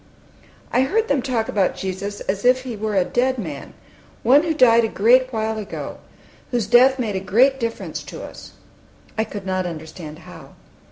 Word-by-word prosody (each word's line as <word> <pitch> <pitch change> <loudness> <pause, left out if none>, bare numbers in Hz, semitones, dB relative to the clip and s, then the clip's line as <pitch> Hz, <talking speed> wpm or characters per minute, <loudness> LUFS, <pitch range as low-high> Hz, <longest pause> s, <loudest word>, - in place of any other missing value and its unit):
I 255 - +4
heard 435 +12 +1
them 280 -2 +2
talk 245 -4 -1
about 195 -3 +1
Jesus 195 +2 -5
as 195 +1 -3
if 255 +1 +4
He 250 -3 -5
were 215 0 -3
a 185 -2 +3
dead 255 +4 0
man, 155 - -7 0.5
one 265 +5 +6
who 330 0 -1
died 235 -4 +5
a - - +2
great 250 +5 +3
while 220 -1 -2
ago, 210 - -7 0.5
whose 240 -4 0
death 250 +5 +5
made 225 -6 -2
a - - 0
great 255 +8 +3
difference 230 -2 -4
to - - -8
us, - - -11 0.6
I 220 - +1
could 205 -3 -8
not 185 -1 -1
understand 160 -1 -8
how. - - -13
225 Hz, 180 wpm, -21 LUFS, 195-255 Hz, 0.6 s, one